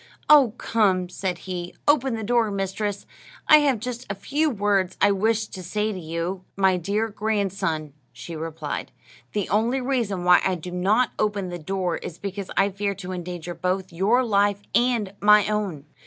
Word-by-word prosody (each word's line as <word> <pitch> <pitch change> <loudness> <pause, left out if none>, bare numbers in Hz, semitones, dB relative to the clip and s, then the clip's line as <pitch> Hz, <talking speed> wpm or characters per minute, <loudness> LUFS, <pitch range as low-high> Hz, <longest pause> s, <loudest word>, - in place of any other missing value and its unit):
"Oh, 275 -7 +6
come," 190 -5 +1
said 185 -1 -3
he, 180 -2 -5
"open 270 -4 +3
the 220 - -4
door, 235 0 +2
mistress; 200 +1 -3 0.4
I 305 - +9
have 275 -6 +2
just 245 +1 -6
a - - -3
few 295 +10 0
words 200 -5 0
I 205 - +5
wish 220 +3 +1
to 190 - -8
say 210 +4 -1
to 185 - -6
you." 170 +3 -4
"My 190 -1 +4
dear 200 +5 -1
grandson," 195 -8 -2 0.2
she 120 +8 -8
replied, 155 -1 -5 0.4
"the 205 -3 -1
only 230 +6 +1
reason 240 -8 -1
why 180 0 +6
I 190 - +1
do 180 +1 -8
not 200 +7 +2
open 205 -3 0
the 175 0 -6
door 180 +1 -2
is 170 - -8
because 200 -1 -5
I 195 +1 +4
fear 200 +1 -2
to 185 -1 -7
endanger 175 -1 -5
both 185 +1 -2
your 210 +9 +3
life 205 -2 +1
and 235 -5 +1
my 210 0 +6
own." 200 -9 -2
200 Hz, 175 wpm, -24 LUFS, 180-220 Hz, 0.4 s, I